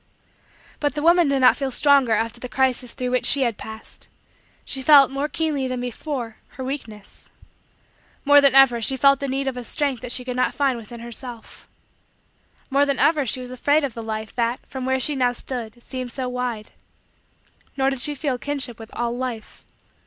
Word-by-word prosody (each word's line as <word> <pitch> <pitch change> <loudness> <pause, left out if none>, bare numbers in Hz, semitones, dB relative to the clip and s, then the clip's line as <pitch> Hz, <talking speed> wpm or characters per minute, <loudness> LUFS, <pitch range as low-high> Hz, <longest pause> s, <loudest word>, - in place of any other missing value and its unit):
But 290 0 -1
the 295 - -3
woman 340 0 +5
did 275 -1 +1
not 255 - +6
feel 275 -2 -2
stronger 275 -3 +3
after 230 +2 -1
the 250 - -7
crisis 255 -2 +1
through 250 -2 -3
which 250 - +2
she 275 -1 +5
had 235 -3 0
passed; 220 +1 -10 0.6
she 270 - -1
felt, 275 -1 +7
more 280 +2 -2
keenly 300 -5 -1
than 255 -1 -3
before, 245 -1 -5 0.2
her 260 - -5
weakness. 230 -7 -7 1.0
More 285 0 +7
than 280 -2 +4
ever, 255 -4 +6
she 265 +4 0
felt 275 +1 +4
the 280 - -3
need 270 +1 -2
of 260 -2 -2
a 250 - -5
strength 275 -1 -2
that 250 - -5
she 250 0 -3
could 250 -1 -4
not 255 - 0
find 275 -3 +1
within 230 0 -10
herself. 235 0 -10 1.0
More 280 +1 +3
than 280 -1 0
ever, 300 -4 +2
she 255 +3 -1
was 250 0 -8
afraid 290 +4 +1
of 275 -4 -2
the 230 - -6
Life, 220 -1 -5
that, 235 +1 -1
from 260 -1 -6
where 265 0 +1
she 295 +3 +1
now 250 -2 +1
stood, 240 -2 -7
seemed 255 -2 -6
so 255 +1 -3
wide. 250 -4 -4 1.1
Nor 270 0 +2
did 270 -2 -4
she 295 +2 0
feel 280 -1 -2
a 250 - -5
kinship 270 -5 -4
with 225 0 -10
all 240 0 -2
Life. 245 -3 -6
255 Hz, 200 wpm, -22 LUFS, 240-275 Hz, 1.1 s, felt